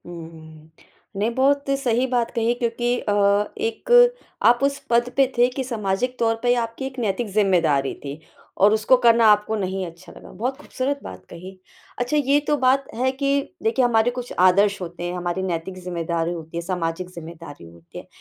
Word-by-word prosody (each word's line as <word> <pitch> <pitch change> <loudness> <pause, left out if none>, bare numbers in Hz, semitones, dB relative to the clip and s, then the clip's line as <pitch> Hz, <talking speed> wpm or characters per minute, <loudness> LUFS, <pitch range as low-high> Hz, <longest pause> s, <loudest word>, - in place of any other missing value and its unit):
उम, 160 -2 -11 0.5
नहीं 205 +3 0
बहुत 280 +1 +2
सही 245 -1 +1
बात 240 -2 0
कही 230 0 +1
क्योंकि 240 +1 0
अ, 205 - -2 0.4
एक 450 +2 -4 0.5
आप 240 +1 +5
उस 280 0 +1
पद 240 +1 +2
पे 270 -1 +5
थे 240 +1 +5
कि 260 +1 -4
सामाजिक 235 +1 -2
तौर 225 -1 +2
पे 245 0 +3
आपकी 230 +4 -6
एक 260 -1 -6
नैतिक 225 +1 -1
ज़िम्मेदारी 170 -9 +2
थी 140 +2 -6 0.4
और 205 +2 +6
उसको 220 +4 +4
करना 230 -1 +5
आपको 210 +1 +1
नहीं 190 -2 -3
अच्छा 170 0 -12
लगा, - - -13
बहुत 255 +5 -3
खूबसूरत 280 -1 -3
बात 90 0 -10
कही। 185 +2 -11 0.4
अच्छा 245 +5 0
ये 285 0 +3
तो 295 - +2
बात 265 +1 +2
है 255 +3 +1
कि 275 +1 0 0.2
देखिए, 235 +3 +2
हमारे 235 0 +2
कुछ 245 0 -7
आदर्श 200 +3 +4
होते 175 0 -7
हैं, 175 0 -3
हमारी 175 +1 -3
नैतिक 185 +1 -4
ज़िम्मेदारी 170 -1 -2
होती 165 0 -8
है, - - -2
सामाजिक 175 0 -3
ज़िम्मेदारी 160 - -11
होती 85 0 -15
है, - - -10
220 Hz, 180 wpm, -22 LUFS, 175-250 Hz, 0.5 s, और